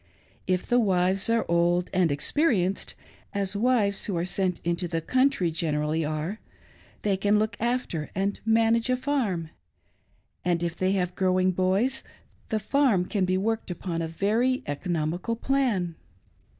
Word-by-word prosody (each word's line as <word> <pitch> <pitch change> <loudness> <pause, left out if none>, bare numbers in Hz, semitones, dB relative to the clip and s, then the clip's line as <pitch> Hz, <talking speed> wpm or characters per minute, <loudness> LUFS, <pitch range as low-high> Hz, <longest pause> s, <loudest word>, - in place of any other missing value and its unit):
If 185 0 0
the 245 - +3
wives 190 -1 +2
are 230 0 +2
old 175 +1 +2
and 180 -2 +3
expe 150 - +1
rienced, 195 - 0 0.4
as 200 0 -1
wives 210 -3 +1
who 195 -4 -1
are 170 - 0
sent 185 -1 -1
into 170 +1 -1
the 165 -1 -1
country 255 - +2
generally 155 -1 0
ar€, 155 +7 -3 0.6
they 200 -2 +2
can 205 +2 +2
then - - +4
look 215 0 -1
after 235 -10 -1
and 195 +2 -1
manage 225 +1 +3
a 255 - +2
farm; 220 - -1 0.9
and 175 -1 +1
if 170 -1 -2
they 185 +1 +1
have 180 -2 0
growing 185 0 +2
boys, 190 +9 +1 0.5
the 220 - +1
farm 215 -3 +2
can 195 -1 0
be 185 0 +1
worked 220 +3 -1
upon 175 -1 -3
a 165 - -2
very 220 +10 +1
economical 170 +7 -2
plan. 235 -9 0
190 Hz, 155 wpm, -26 LUFS, 175-225 Hz, 0.9 s, then